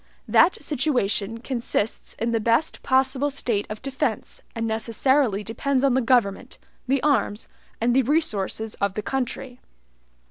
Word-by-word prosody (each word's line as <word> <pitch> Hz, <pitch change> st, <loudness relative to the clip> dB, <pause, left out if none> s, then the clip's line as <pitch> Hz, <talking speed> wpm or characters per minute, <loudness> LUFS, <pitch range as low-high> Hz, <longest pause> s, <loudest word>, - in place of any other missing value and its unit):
That 340 Hz, -3 st, +4 dB
situation 230 Hz, -7 st, 0 dB
consists 235 Hz, -4 st, -2 dB
in 230 Hz, +1 st, -1 dB
the 230 Hz, -, +1 dB
best 230 Hz, +7 st, +1 dB
possible 265 Hz, +2 st, +2 dB
state 235 Hz, -7 st, -1 dB
of 215 Hz, +2 st, -7 dB
defense, 270 Hz, -4 st, -2 dB
and 230 Hz, 0 st, -2 dB
necessarily 225 Hz, 0 st, +1 dB
depends 260 Hz, +5 st, -1 dB
on 275 Hz, -2 st, +4 dB
the 260 Hz, -, +3 dB
government, 240 Hz, -1 st, +1 dB, 0.3 s
the 270 Hz, 0 st, +1 dB
arms, 230 Hz, -7 st, +1 dB, 0.3 s
and 240 Hz, +2 st, +2 dB
the 265 Hz, -, +6 dB
resources 220 Hz, -, -1 dB
of 200 Hz, -1 st, 0 dB
the 210 Hz, -, -3 dB
country. 255 Hz, 0 st, -3 dB
245 Hz, 140 wpm, -24 LUFS, 220-270 Hz, 0.3 s, the